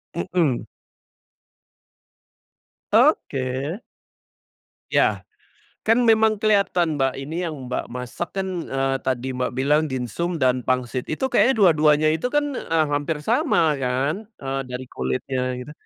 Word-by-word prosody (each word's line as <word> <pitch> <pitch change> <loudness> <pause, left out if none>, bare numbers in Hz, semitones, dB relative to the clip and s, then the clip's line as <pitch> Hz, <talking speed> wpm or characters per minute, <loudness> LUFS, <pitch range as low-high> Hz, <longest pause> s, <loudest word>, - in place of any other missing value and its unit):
Mhm. 145 - 0 2.3
Oke. 150 - +1 1.1
Ya, - - +2 0.6
kan 225 +1 +4
memang 220 -1 +3
kelihatan, 190 -7 +2
Mbak, 135 -1 +1
ini 160 +6 -3
yang 145 -6 -6
Mbak - - -2
masak 125 +7 -5
kan, 190 0 -1 0.2
eee, 135 0 0
tadi 130 0 -1
Mbak 125 0 -1
bilang 145 +5 +2
dimsum 150 +6 -3
dan 125 -1 +2
pangsit, 125 0 -1
itu 155 - -2
kayaknya 265 - +4
dua-duanya 155 -4 +5
itu 160 +10 -2
kan, 295 - +3
eee, 160 -1 +1
hampir 145 +2 -1
sama 150 0 +2
kan, 135 +10 -1 0.2
eee, 135 0 -2
dari 125 +1 -5
kulitnya 65 - -3 0.2
gitu. 145 - -9
145 Hz, 120 wpm, -23 LUFS, 130-175 Hz, 2.3 s, dua-duanya